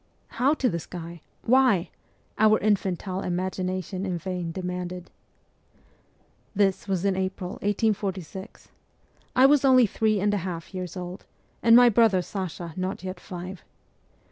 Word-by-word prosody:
' - - -39
How 280 +4 +4
to 270 - +1
the 170 -8 -1
sky? 170 0 -8 0.2
Why? 245 -8 +3 0.2
' - - -39
our 215 0 +6
infantile 195 -2 -1
imagina 185 +1 -2
tion 185 +2 -5
in 185 -3 -2
vain 180 -1 -4
demanded. 180 0 -5 1.4
This 195 0 +1
was 190 -1 -1
in 195 -1 +2
April 185 -1 -3
1846. 200 -2 -2 0.7
I 255 - +6
was 285 0 +5
only 255 -2 +6
three 215 0 +1
and 205 +1 +1
a - - +2
half 175 -1 -5
years 185 -1 -5
old, 180 +2 -7 0.3
and 230 0 +6
my 245 0 +8
brother 220 -5 +4
Sasha 175 -3 -5
not 185 0 -3
yet 185 -1 -5
five. 180 -1 -8
190 Hz, 145 wpm, -26 LUFS, 180-210 Hz, 1.4 s, my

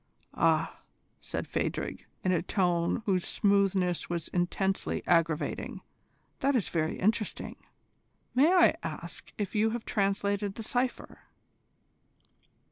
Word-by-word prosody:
"Ah!" - - +2 0.4
said - - -4
Phadrig, - - -3 0.2
in 185 - +2
a 175 -3 +2
tone 175 +2 +1
whose 185 -4 +2
smoothness 195 -3 +2
was 170 -2 -3
intensely 190 +2 -1
aggravating, 165 -3 0 0.6
"that 275 +1 +2
is 230 - +1
very 160 -2 -1
interesting. 215 +2 -1 0.8
May 280 +7 +5
I 365 -2 +6
ask - - -6
if 205 -3 -3
you 220 +1 +3
have 230 - -13
translated 200 0 0
the 225 - -6
cypher?" 245 +2 -2
195 Hz, 115 wpm, -30 LUFS, 175-220 Hz, 0.8 s, I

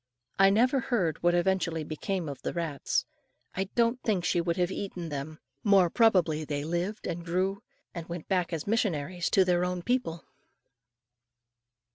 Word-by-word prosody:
I 195 0 +7
never 250 +7 +3
heard 195 - -1
what 175 0 +3
eventually 175 -3 +1
became 165 +3 -3
of 140 -2 -6
the - - -3
rats. 165 -5 -1 0.5
I 190 - -1
don't 235 +1 +2
think 195 -6 0
she 175 - +2
would 170 0 -1
have 180 0 +1
eaten 185 -4 -5
them. 145 +2 -5 0.3
More 195 -5 +5
probably 180 -9 +3
they 145 -1 -3
lived 175 +6 -3
and 170 +1 -3
grew, 185 +3 -1 0.3
and 170 -2 -7
went 170 -1 -6
back 185 -3 0
as 160 -3 -3
missionaries 180 - 0
to 190 -3 +4
their 180 -1 +2
own 180 -1 -2
people. 240 -9 -1
180 Hz, 160 wpm, -29 LUFS, 165-195 Hz, 0.5 s, I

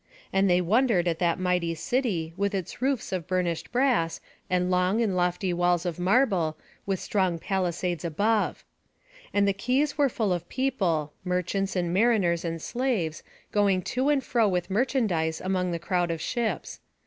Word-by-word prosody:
And 195 0 +3
they 180 0 +4
wondered 205 -1 +2
at 165 -1 0
that 170 -2 +1
mighty 180 -2 0
city, 180 - -1
with 200 +1 -1
its 190 +4 -5
roofs 265 -2 0
of 180 -4 -3
burnished 180 -3 -1
brass, 245 -10 +1 0.3
and 180 0 +1
long 180 +4 +2
and 215 -5 +1
lofty 180 +1 0
walls 175 0 +1
of 175 -1 -3
marble, 180 - +2 0.3
with 195 -2 0
strong 185 -4 0
palisades 180 -1 -2
above. 205 +7 0 0.7
And 200 0 +2
the 200 - +3
quays 260 +9 0
were 285 -2 +4
full 215 -5 0
of 175 -1 -4
people, 185 - 0
merchants, 185 +2 -1
and 175 -2 0
mariners, 195 -5 +2
and 165 -1 -3
slaves, 220 -8 -2 0.3
going 200 -3 +2
to 260 +3 +1
and 285 -2 +2
fro 230 -3 +2
with 180 -1 -1
merchandise 195 - +1
among 185 -1 -1
the 170 - -1
crowd 175 +1 0
of 165 -1 -2
ships. 235 +6 -2
185 Hz, 165 wpm, -27 LUFS, 175-220 Hz, 0.7 s, they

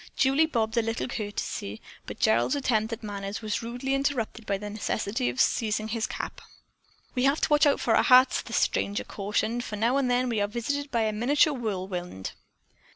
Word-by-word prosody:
Julie 280 +4 +4
bobbed 225 -6 -1
a - - +5
little 225 +1 -2
curtsy, 205 - -4 0.3
but - - -7
Gerald's 115 - +3
attempt 230 -5 0
at 230 0 -5
manners 200 0 -5
was 215 -1 -1
rudely 245 +3 -3
interrupted 260 -5 -1
by 200 - 0
the 210 +1 -7
necessity 205 - -2
of 120 - -5
seizing 215 -1 +1
his 225 0 -1
cap. - - -6 0.7
"We 250 +1 +1
have 275 +3 +3
to - - +1
watch 295 0 +5
out 280 - +3
for 225 - +2
our - - +5
hats," 255 +1 +6
the - - -11
stranger 200 +1 0
cautioned, 215 +4 -2
"for 215 - -5
now 230 +6 +2
and 270 -2 +1
then 250 +1 +2
we 225 -4 0
are 205 - +1
visited 285 +6 -3
by 235 -4 +1
a 215 -1 0
miniature 285 +8 +3
whirlwind." 185 - -4
225 Hz, 195 wpm, -27 LUFS, 205-255 Hz, 0.7 s, hats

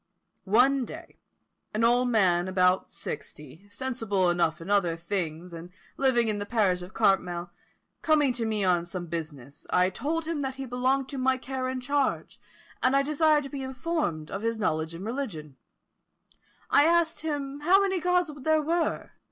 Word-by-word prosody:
One 260 +5 +4
day, - - -10 0.6
an 220 - +1
old 245 +2 +3
man 185 -6 +3
about 185 0 +2
sixty, 155 +7 -8
sensible 205 -7 0
enough 170 -2 +1
in 165 - -9
other 195 -5 +2
things, 170 -1 -4
and 165 +1 -8 0.3
living 250 -4 +2
in 210 -1 -1
the 205 - -3
parish 200 -6 +1
of 180 +1 -10
Cartmel, 180 -5 +1 0.5
coming 295 -4 +3
to 235 -2 -2
me 215 -2 -1
on 180 -2 +2
some 175 0 -5
business, 150 -5 -7
I 180 +1 +3
told 315 - -2
him 320 -2 -2
that 265 -1 -3
he 270 0 -5
belonged 260 +2 0
to 275 - -5
my 260 0 +2
care 260 0 -4
and 260 0 -3
charge, 280 +1 -1 0.4
and 255 +1 +3
I 275 - +4
desired 305 +1 +3
to 275 - -7
be 275 0 -5
informed 265 - -3
of 195 - -4
his 230 0 -1
knowledge 160 -5 -1
in 175 - -8
religion. 210 - -5 1.2
I 290 - +6
asked 335 0 +2
him 290 -3 -4
how 355 +6 +5
many 385 -2 +1
Gods 360 -1 +1
there 315 +2 +2
were? 335 +2 -1
235 Hz, 170 wpm, -27 LUFS, 180-275 Hz, 1.2 s, I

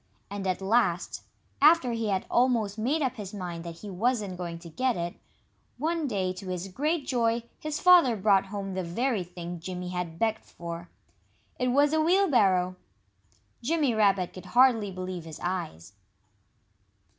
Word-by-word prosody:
And 200 -1 -4
at 185 +1 -1
last, 195 -4 +1 0.4
after 300 -4 +6
he 230 -1 -2
had 190 -2 0
almost 235 -5 +2
made 285 +8 +1
up 260 -1 -1
his 205 -1 -7
mind 175 -4 -5
that 170 0 -8
he 210 - -7
wasn't 210 -1 0
going 175 -2 -5
to 170 +1 -12
get 250 +8 0
it, 170 0 -3 0.6
one 320 +2 -1
day 190 -6 -1
to 185 +1 -9
his 185 +1 -4
great 300 - -1
joy 235 -2 +1 0.2
his 305 0 -3
father 350 -10 +6
brought 195 -1 +3
home 195 -1 -5
the 185 - -2
very 215 +4 -1
thing 175 0 -7
Jimmy 180 +1 -5
had 180 -2 -4
begged 220 +2 0
for. 170 0 -8 0.7
It 250 - +1
was 285 +4 +3
a 315 - +3
wheelbarrow! 235 - +3 0.8
Jimmy 290 0 +1
Rabbit 195 -4 +2
could 185 - -10
hardly 240 -5 +5
believe 185 -2 -6
his 160 -2 -9
eyes. 165 - -4
200 Hz, 160 wpm, -28 LUFS, 180-250 Hz, 0.8 s, after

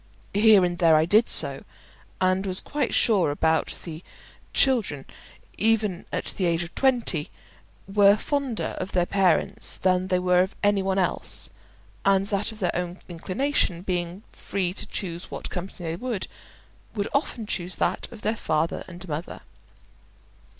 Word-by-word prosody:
Here 205 -2 +6
and 175 -1 -3
there 165 -2 +5
I 155 +1 +4
did 215 +7 +4
so, - - +7 0.6
and 185 +1 +1
was 185 0 +3
quite 290 -4 -2
sure 185 -10 +3
that 160 +1 +1 0.2
the 165 0 -8 0.5
children, 220 - +1 0.5
even 210 -4 +1
at - - -3
the 185 - 0
age 170 0 +1
of 170 - -10
twenty, 240 - +1 0.6
were 200 +1 +5
fonder 275 -1 -2
of 190 - -5
their 180 -1 +2
parents 185 -3 +1
than 185 0 +1
they 185 -1 +1
were 180 0 +3
of 190 +1 -2
any 205 -1 +3
one 190 0 -1
else; 185 -2 -1 0.5
and 195 0 +3
that 205 +2 0
of 220 - -12
their 185 -4 -1
own 180 0 -3
inclination, 185 - -1
being 180 +1 -3
free 185 -3 -3
to - - -6
choose 175 -3 -5
what - - -7
company 180 -2 -6
they 165 - -3
would, 230 -1 -4
they - - -5 0.7
would 205 -1 -1
often 275 -5 -1
choose 180 -3 -3
that - - -1
of 230 -3 -12
their 215 +2 0
father 160 -2 -1
and 180 0 -10
mother. 155 +2 -5
185 Hz, 160 wpm, -25 LUFS, 175-210 Hz, 0.7 s, so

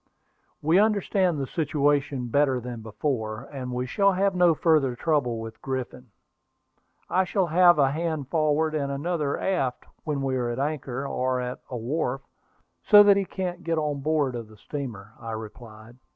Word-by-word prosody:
"We 165 +5 +4
understand 200 -5 +2
the 140 - -2
situation 145 -3 0
better 135 0 +2
than 120 -1 -7
before, 110 0 -3
and 130 -2 -5
we 125 0 -2
shall 200 +9 +2
have 195 +1 +1
no 175 -2 +4
further 150 -6 +2
trouble 125 -5 0
with 115 0 -8
Griffin. 130 -1 -5 1.0
I 185 - +2
shall 190 0 0
have 175 +1 +5
a 135 -2 +3
hand 155 -2 -2
forward 155 0 +1
and 140 -2 -1
another 150 0 -2
aft 135 -10 -1 0.2
whenever 140 -3 -2
we 130 -1 0
are 120 -1 -1
at 120 - -3
anchor, 140 -2 -3
or 130 -1 -1
at 125 0 -4
a 125 - -4
wharf, 135 +2 -2 0.6
so 205 -1 +8
that 205 -1 +6
he 200 -1 0
can't 180 -2 -5
get 165 -1 -1
on 150 -2 -1
board 150 -3 +1
of 115 -2 -6
the 110 0 -17
steamer," 110 -7 -7
I 115 -1 -6
replied. 110 +1 -10
140 Hz, 170 wpm, -26 LUFS, 125-165 Hz, 1.0 s, so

